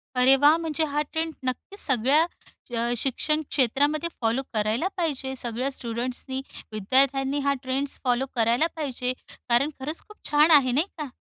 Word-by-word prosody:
अरे 255 +2 +6
वाह! 290 +3 +6
म्हणजे 325 -1 -2
हा 295 - +2
ट्रेंड 320 0 -2
नक्कीच 255 +10 -4
सगळ्या 270 +5 +3 0.5
अ, 235 +1 0
शिक्षण 305 +5 0
क्षेत्रामध्ये 290 +5 +1
फॉलो 230 +3 +1
करायला 220 - 0
पाहिजे 275 -6 -2
सगळ्या 245 +2 -2
स्टुडंट्सनी, 255 +2 -4 0.3
विद्यार्थ्यांनी, 270 +6 +2
हा 280 0 +1
ट्रेंड्स 270 +2 -2
फॉलो 250 0 +1
करायला 235 +6 +3
पाहिजे 255 -5 -2 0.4
कारण 240 +5 +3
खरंच 300 +5 -3
खूप 425 - -15
छान 300 +2 +5
आहे, 275 -5 +6
नाही 300 +9 +2
का? 300 -2 -4
270 Hz, 150 wpm, -25 LUFS, 245-300 Hz, 0.5 s, अरे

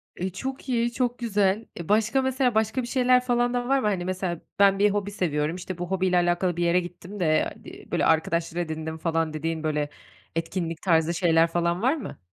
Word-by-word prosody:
E, 185 +2 -2
çok 265 +7 -6
iyi, 235 -1 +1
çok 245 -1 -1
güzel. 210 -2 +1
E, 170 - -7
başka 225 +5 +3
mesela 260 -2 +1
başka 220 +4 +1
bir 240 - -5
şeyler 250 0 +3
falan 245 0 +1
da 245 0 -1
var 275 0 +3
mı? 215 - 0
Hani, 185 -4 -1
mesela 185 -2 -3 0.2
ben 195 -1 +5
bir 205 0 +5
hobi 205 0 -2
seviyorum, 155 -4 -1
işte, 185 0 -6
bu 175 +1 -5
hobiyle 185 -1 +2
alakalı 175 0 +1
bir 175 - +1
yere 170 +1 +3
gittim 180 +3 -8
de, 155 -3 +2
di - - -12
böyle - - +1
arkadaşlar 165 +1 +1
edindim 160 -1 -4
falan 160 -1 -1
dediğin, 160 +1 -3
böyle, 150 -1 -1 0.5
etkinlik 165 0 -3
tarzı 165 -2 +2
şeyler 165 -1 +3
falan 170 +2 0
var 260 +6 +3
mı? 275 - -7
185 Hz, 205 wpm, -25 LUFS, 165-230 Hz, 0.5 s, ben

